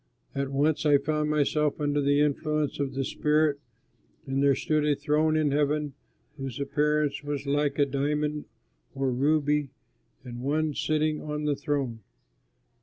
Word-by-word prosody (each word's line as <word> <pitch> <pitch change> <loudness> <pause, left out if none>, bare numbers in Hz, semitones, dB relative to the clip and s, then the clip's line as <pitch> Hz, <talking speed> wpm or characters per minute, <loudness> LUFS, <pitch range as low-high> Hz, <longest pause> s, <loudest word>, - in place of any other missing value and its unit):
At 140 0 -2
once 145 +3 +1
I 145 -2 +5
found 150 +1 -1
myself 150 0 +1
under 145 0 +1
the 145 +1 +3
influence 150 0 0
of 135 -2 -2
the 135 0 -1
Spirit, 150 0 +1 0.7
and 135 0 -1
there 140 -1 +4
stood 155 +2 0
a 150 -1 +2
throne 150 +2 +1
in 150 -2 +2
heaven 150 0 0 0.4
whose 135 -3 -5
appearance 150 +1 0
was 145 -1 -4
like 145 0 0
a 145 - +4
diamond 150 +2 -1 0.5
or 135 -1 0
ruby 145 +2 +1 0.5
and 120 -2 -8
One 155 +4 0
was 145 - -5
sitting 155 0 0
on 150 0 -4
the 145 -1 +1
throne. 135 -6 -2
145 Hz, 155 wpm, -27 LUFS, 140-150 Hz, 0.7 s, I